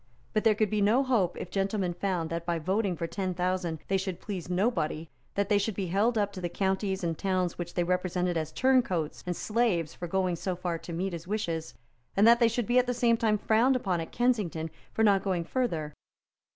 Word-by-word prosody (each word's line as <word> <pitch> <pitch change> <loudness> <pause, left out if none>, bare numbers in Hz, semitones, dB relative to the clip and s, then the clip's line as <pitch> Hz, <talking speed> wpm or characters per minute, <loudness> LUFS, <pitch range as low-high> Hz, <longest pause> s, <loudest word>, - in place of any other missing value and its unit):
But 215 - +1
there 220 -1 +5
could 215 0 +1
be 210 -1 +1
no 225 +7 +4
hope 225 -10 +1
if - - -6
gentlemen 195 -2 0
found 175 -3 -2
that 170 0 -2
by 170 0 -1
voting 190 +3 0
for 165 - -2
ten 185 +1 -3
thousand 180 -2 -1
they 195 - +2
should 190 -2 -3
please 185 -4 -6
nobody, 175 -5 0 0.2
that 200 -1 +1
they 205 0 +3
should 205 0 -1
be 195 - -2
held 205 +7 +1
up 205 -1 0
to 185 - -7
the 175 - -2
counties 190 +1 -1
and 165 -1 0
towns 185 -1 -1
which 175 0 -5
they 175 - +2
represented 180 0 0
as 160 -1 -2
turncoats 235 - +1
and 180 - -1
slaves 210 -9 0
for 175 - -6
going 185 -1 0
so 185 +2 -2
far 175 -2 -3
to 170 - -9
meet 180 +3 -2
his 170 +1 -7
wishes, 170 - -3 0.4
and 205 +3 +6
that 235 0 +7
they 235 - +5
should 230 0 -1
be 245 +3 +4
at 250 - +1
the 250 - 0
same 235 -1 +3
time 220 -2 +2
frowned 230 +6 +3
upon 185 -8 0
at 165 - -7
Kensington 200 -10 0 0.2
for 220 - 0
not 200 -3 +5
going 185 -4 0
farther. 165 - -2
190 Hz, 225 wpm, -29 LUFS, 175-215 Hz, 0.4 s, that